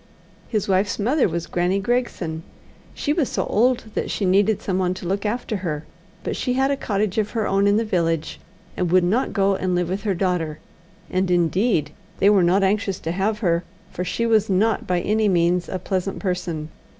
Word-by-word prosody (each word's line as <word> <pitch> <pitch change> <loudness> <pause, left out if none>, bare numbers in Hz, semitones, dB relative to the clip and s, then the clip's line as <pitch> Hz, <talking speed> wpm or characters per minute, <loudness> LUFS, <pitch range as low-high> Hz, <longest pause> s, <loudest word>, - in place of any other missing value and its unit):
His 215 -4 -1
wife's 195 +1 +1
mother 250 +4 +2
was 170 0 -3
Grannie 180 +2 0
Gregson. 200 -7 -1 0.5
She 295 - 0
was 305 -5 0
so - - -1
old 245 +4 +2
that - - -2
she 200 - -1
needed 200 +3 +3
someone 185 -1 -1
to 185 - -8
look 200 +3 -1
after 220 -1 -2
her, 160 -5 -4 0.4
but - - -2
she 250 - -1
had 265 +2 +2
a - - +2
cottage 210 -5 -1
of 210 -1 0
her 220 - +1
own 195 +1 +2
in 205 +1 +4
the 225 - +1
village, 165 -5 -1 0.4
and 180 -2 -1
would 185 0 +5
not 215 +9 +1
go 195 -1 +2
and 185 -1 -1
live 175 -1 0
with 190 +2 -2
her 195 -2 -1
daughter, 175 -4 -1 0.5
and, 185 0 0
indeed, 175 - +2 0.3
they 200 - +5
were 200 -2 +5
not 180 +3 +3
anxious 195 -1 0
to 165 - -2
have 205 +5 -1
her, 170 0 +2 0.3
for 180 - -3
she 205 +6 -1
was 220 -2 +3
not 205 +3 +1
by 180 -1 +1
any 215 +2 +1
means 175 0 +2
a 185 - -2
pleasant 190 +1 -2
person. 175 -5 -3
190 Hz, 200 wpm, -22 LUFS, 180-215 Hz, 0.5 s, would